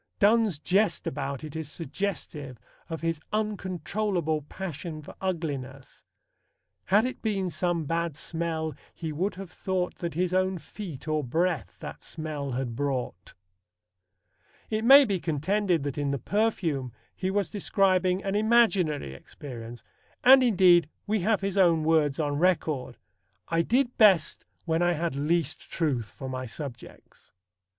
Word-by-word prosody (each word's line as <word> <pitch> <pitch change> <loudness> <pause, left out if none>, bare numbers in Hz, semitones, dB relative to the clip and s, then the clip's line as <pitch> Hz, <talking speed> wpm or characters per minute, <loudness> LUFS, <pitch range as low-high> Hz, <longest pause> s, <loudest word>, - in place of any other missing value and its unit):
Donne's 215 -4 +4
jest 195 +7 +1
about 140 0 -3
it 155 -1 -8
is 160 -2 -5
suggestive 155 -5 -4 0.3
of 165 -1 -5
his 165 -1 -1
uncontrollable 190 -5 -1
passion 155 0 -6
for - - -10
ugliness: 140 -8 -4 0.8
Had 205 +5 +4
it 255 - -4
been 195 -5 -1
some 175 -2 -1
bad 165 -1 -1
smell, 160 -1 -3 0.2
he 160 -2 -4
would 180 +7 -1
have 190 -2 -8
thought 185 -1 -2
That 170 -3 -4
his 180 +1 0
own 185 0 +1
feet, 170 -5 -9
or 155 -1 0
breath, 145 - -1
that - - -8
smell 150 -4 -4
had 120 -2 -3
brought. 130 -8 -3 1.4
It 215 0 0
may 275 +4 +9
be 200 -5 -1
contended 175 +2 0
that 145 0 -3
in 145 -1 0
The 140 - 0
Perfume 165 - 0 0.2
he 185 - -2
was 195 -4 0
describing 190 -2 +2
an 195 - -1
imaginary 205 - +2
experience, 120 - -9 0.4
and 265 +1 +9
indeed 180 - +5 0.2
we 215 +1 +1
have 210 +3 +1
his 195 0 -2
own 170 -4 +4
words 155 -3 +2
on 145 -2 0
record: 160 -7 0 0.5
"I 165 0 +2
did 245 +7 +1
best 195 -8 +4 0.2
when 165 0 +1
I 175 0 +3
had 165 -2 -2
least 155 +2 -1
truth 135 - -1
for 135 - -8
my 130 0 -4
subjects." 125 0 -9
170 Hz, 145 wpm, -27 LUFS, 145-195 Hz, 1.4 s, may